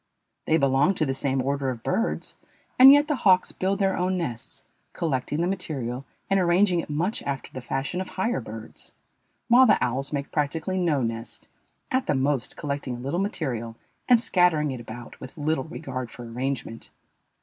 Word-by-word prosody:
They 160 Hz, -, +3 dB
belong 140 Hz, +6 st, +3 dB
to 155 Hz, -, +1 dB
the 135 Hz, -, -1 dB
same 135 Hz, -1 st, 0 dB
order 140 Hz, 0 st, -1 dB
of 120 Hz, -3 st, -5 dB
birds, 225 Hz, +6 st, -1 dB, 0.4 s
and 265 Hz, +1 st, +11 dB
yet 290 Hz, +1 st, +6 dB
the 300 Hz, -3 st, 0 dB
hawks 185 Hz, -6 st, +4 dB
build 195 Hz, +1 st, -1 dB
their 195 Hz, -1 st, +1 dB
own 185 Hz, +1 st, 0 dB
nests, 120 Hz, -10 st, -5 dB, 0.3 s
collecting 150 Hz, -1 st, -1 dB
the 175 Hz, -, +1 dB
material 140 Hz, -9 st, -3 dB, 0.2 s
and 195 Hz, 0 st, +2 dB
arranging 180 Hz, +1 st, +3 dB
it 165 Hz, -, -5 dB
much 170 Hz, +8 st, -1 dB
after 140 Hz, -1 st, -4 dB
the 130 Hz, -, -6 dB
fashion 135 Hz, +8 st, -3 dB
of 190 Hz, -, -6 dB
higher 190 Hz, -, 0 dB
birds, 110 Hz, 0 st, -9 dB, 0.5 s
while 250 Hz, +2 st, +7 dB
the -, -, +5 dB
owls 130 Hz, +3 st, -1 dB
make 140 Hz, -1 st, -3 dB
practically 160 Hz, +5 st, -1 dB
no 155 Hz, -7 st, +1 dB
nest, 115 Hz, 0 st, -5 dB, 0.4 s
at 260 Hz, 0 st, 0 dB
the -, -, +2 dB
most 135 Hz, -2 st, -1 dB
collecting 140 Hz, -3 st, -3 dB
a -, -, -8 dB
little 140 Hz, +8 st, -2 dB
material 130 Hz, -, -3 dB, 0.3 s
and 245 Hz, -2 st, +7 dB
scattering 175 Hz, -9 st, +2 dB
it 130 Hz, -, -5 dB
about 120 Hz, +1 st, -10 dB
with 130 Hz, +6 st, -10 dB
little 150 Hz, -2 st, -1 dB
regard 130 Hz, -6 st, -6 dB
for 120 Hz, -, -10 dB
arrangement. 125 Hz, -1 st, -4 dB
145 Hz, 180 wpm, -25 LUFS, 130-185 Hz, 0.5 s, and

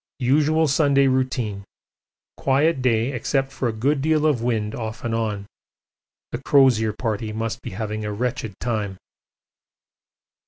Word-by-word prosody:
Usual 150 Hz, +5 st, +3 dB
Sunday 140 Hz, -1 st, +3 dB
routine. 130 Hz, -6 st, 0 dB, 0.7 s
Quiet 140 Hz, +2 st, +2 dB
day 120 Hz, 0 st, +2 dB
except 135 Hz, +2 st, -1 dB
for 130 Hz, -, -2 dB
a -, -, 0 dB
good 135 Hz, +6 st, 0 dB
deal 155 Hz, +1 st, +2 dB
of 145 Hz, -7 st, +2 dB
wind 110 Hz, -3 st, -1 dB
off 110 Hz, 0 st, -5 dB
and 115 Hz, -, -2 dB
on. 110 Hz, -3 st, -2 dB, 0.9 s
The 120 Hz, -, -4 dB
Crozier 130 Hz, -6 st, +4 dB
Party 110 Hz, -1 st, -3 dB
must 115 Hz, +1 st, -3 dB
be -, -, -6 dB
having 110 Hz, -1 st, -3 dB
a 105 Hz, -, -3 dB
wretched 115 Hz, -1 st, -3 dB
time. 105 Hz, -5 st, -2 dB
120 Hz, 135 wpm, -23 LUFS, 110-135 Hz, 0.9 s, Crozier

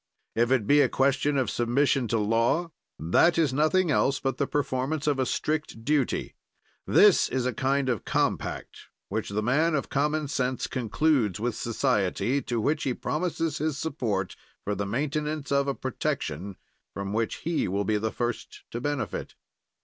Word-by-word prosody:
"If 120 Hz, +1 st, +2 dB
it 130 Hz, -5 st, +2 dB
be 145 Hz, +5 st, +5 dB
a -, -, +3 dB
question 140 Hz, +2 st, +1 dB
of 130 Hz, -, 0 dB
submission 125 Hz, +2 st, +1 dB
to 115 Hz, -, 0 dB
law, 115 Hz, +10 st, +1 dB, 0.3 s
that 160 Hz, -, +3 dB
is 155 Hz, -6 st, +2 dB
nothing 155 Hz, +4 st, +2 dB
else 135 Hz, -1 st, +2 dB
but 135 Hz, -1 st, -2 dB
the 140 Hz, -, 0 dB
performance 140 Hz, +1 st, -1 dB
of 145 Hz, -3 st, +1 dB
a 130 Hz, -, +1 dB
strict 155 Hz, -7 st, -2 dB
duty; 145 Hz, -3 st, 0 dB, 0.5 s
this -, -, +5 dB
is 130 Hz, -1 st, -1 dB
a 125 Hz, -, 0 dB
kind 135 Hz, +3 st, 0 dB
of 120 Hz, -6 st, -1 dB
compact -, -, -2 dB, 0.2 s
which 110 Hz, +2 st, -2 dB
the 105 Hz, +2 st, -1 dB
man 155 Hz, +7 st, +2 dB
of 140 Hz, -, -2 dB
common 150 Hz, +2 st, 0 dB
sense 130 Hz, -3 st, -1 dB
concludes 125 Hz, -, +1 dB
with 120 Hz, +2 st, -1 dB
society, 115 Hz, +1 st, 0 dB
to 120 Hz, -3 st, -2 dB
which 150 Hz, +7 st, 0 dB
he 130 Hz, -3 st, -1 dB
promises 165 Hz, -2 st, -2 dB
his 155 Hz, -2 st, -1 dB
support 115 Hz, -, -2 dB, 0.3 s
for 105 Hz, -, -1 dB
the 100 Hz, 0 st, -3 dB
maintenance 150 Hz, +5 st, -2 dB
of 140 Hz, 0 st, +2 dB
a 140 Hz, -, 0 dB
protection 100 Hz, -, -3 dB, 0.4 s
from 100 Hz, 0 st, -4 dB
which 115 Hz, +1 st, 0 dB
he 165 Hz, -1 st, 0 dB
will 100 Hz, +2 st, -1 dB
be 110 Hz, -1 st, +1 dB
the 110 Hz, +1 st, -2 dB
first 120 Hz, -1 st, -4 dB
to 120 Hz, -, -4 dB
benefit. 145 Hz, 0 st, -3 dB
130 Hz, 170 wpm, -27 LUFS, 115-150 Hz, 0.5 s, be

